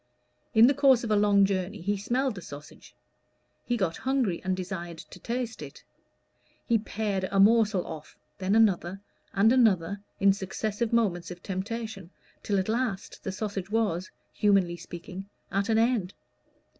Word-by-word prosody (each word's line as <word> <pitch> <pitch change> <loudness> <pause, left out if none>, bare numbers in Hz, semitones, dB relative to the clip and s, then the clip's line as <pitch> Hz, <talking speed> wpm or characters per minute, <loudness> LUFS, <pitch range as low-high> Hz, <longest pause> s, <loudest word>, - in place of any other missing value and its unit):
In 220 +1 +8
the 270 - +5
course 270 -4 +4
of 225 - -3
a - - +4
long 205 -1 +5
journey 195 +1 -2
he 205 +4 -1
smelled 245 +6 0
the 185 - -8
sausage; 145 -2 -12 0.7
he 245 - +1
got 185 -6 -1
hungry, 260 -9 0
and 185 -1 -1
desired 175 -2 -5
to - - -12
taste 240 0 -4
it; - - -10 0.8
he 230 -2 +3
pared 205 -3 -2
a 195 - 0
morsel 210 -2 +4
off, 155 -2 -9 0.2
then 190 +2 +1
another, 195 -4 +2 0.3
and 215 +4 +4
another, 200 -6 +2 0.2
in 195 0 +5
successive 205 +3 -3
moments 200 -7 +1
of 175 0 -9
temptation, 200 -1 -5 0.3
till 205 - 0
at 190 - 0
last 225 -3 -2
the 190 - -3
sausage 195 -1 -4
was, 205 -5 0 0.2
humanly 195 -4 +2
speaking, 180 +3 -9 0.2
at 200 +3 0
an 220 - +3
end. 225 -5 +1
200 Hz, 155 wpm, -28 LUFS, 185-225 Hz, 0.8 s, In